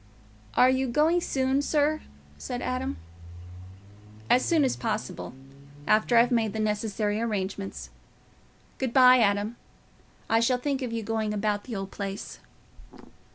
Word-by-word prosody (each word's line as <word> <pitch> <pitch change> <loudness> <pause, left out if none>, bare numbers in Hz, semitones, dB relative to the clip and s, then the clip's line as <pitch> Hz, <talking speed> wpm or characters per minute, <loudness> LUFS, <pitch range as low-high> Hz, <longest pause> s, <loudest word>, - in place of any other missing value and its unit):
"Are 255 +1 +6
you 260 0 0
going 310 +8 +2
soon, 265 -2 0
sir?" 300 +1 +1 0.4
said 245 -1 -5
Adam. 255 - -3 1.3
"As 255 - +5
soon 325 -3 +2
as 260 - +1
possible—after 145 - -2
I've 240 +2 +5
made 225 -3 +1
the 220 - -4
necessary 210 0 -1
arrangements. 200 -3 -4 0.9
Good 260 -3 -2
bye, 255 -1 +7
Adam. 205 +1 +1 0.7
I 225 - +3
shall 250 +2 +2
think 275 +1 -2
of 250 -3 -3
you 230 -1 -3
going 220 -1 -2
about 205 0 -1
the 240 - -6
old 195 -1 -5
place." 200 -1 -6
225 Hz, 130 wpm, -27 LUFS, 205-255 Hz, 1.3 s, bye